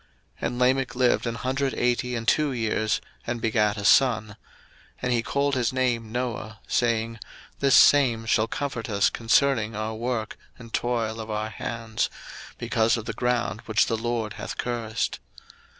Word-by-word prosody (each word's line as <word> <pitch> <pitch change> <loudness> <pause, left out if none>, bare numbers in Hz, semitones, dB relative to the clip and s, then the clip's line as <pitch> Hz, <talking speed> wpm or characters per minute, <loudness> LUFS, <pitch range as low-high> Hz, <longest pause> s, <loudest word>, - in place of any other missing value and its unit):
01:005:028 - - +1
And 120 - -5
Lamech 130 +1 +2
lived 125 -1 +2
an 115 - -2
hundred 135 +2 -1
eighty 125 0 0
and 115 -1 -4
two 150 -2 +3
years, 110 -2 0 0.3
and 120 0 -2
begat 110 -2 +1
a 100 - -4
son: 115 -5 +4
01:005:029 105 - -11 0.7
And 125 -1 +1
he 120 - +2
called 140 +4 0
his 125 -3 +1
name 120 -4 -1
Noah, 115 -3 -4
saying, 115 -1 0 0.4
This 140 -1 +4
same 125 -6 +5
shall 110 0 +2
comfort 130 -2 -4
us 100 -2 +2
concerning 115 -2 +2
our 110 +1 -3
work 115 -1 -3 0.2
and 115 -2 -13
toil 115 -2 -1
of 110 0 -6
our 110 0 -2
hands, 110 +1 -3 0.5
because 115 +1 +1
of 115 - -6
the 115 - -3
ground 120 -3 -1
which 110 +1 +3
the 115 - -1
LORD 115 -1 -2
hath - - -6
cursed. 115 -2 -2
115 Hz, 165 wpm, -25 LUFS, 110-125 Hz, 0.7 s, same